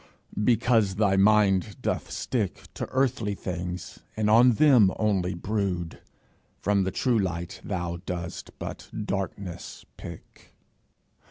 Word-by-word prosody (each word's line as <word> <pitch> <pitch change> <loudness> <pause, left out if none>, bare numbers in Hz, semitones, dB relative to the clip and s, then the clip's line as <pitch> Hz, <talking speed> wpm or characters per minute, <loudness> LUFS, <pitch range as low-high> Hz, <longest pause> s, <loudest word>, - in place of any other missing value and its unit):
Because 115 -4 +3
thy 100 -2 +3
mind 100 -1 +3
doth - - -1
stick 110 -7 -2
To - - -4
earthly 130 -6 0
things, 90 -1 -5 0.2
and 105 -1 +2
on 120 +2 +7
them 120 -7 +6
only 95 -4 +1
brood, 90 -3 -2 0.6
From 100 -1 +1
the 95 - -1
true 120 +1 +1
light 85 -3 -3
thou 90 -3 -3
dost 85 -1 -5
but - - -7 0.2
darkness 95 -2 -5
pick. - - -12
100 Hz, 115 wpm, -27 LUFS, 90-110 Hz, 0.6 s, on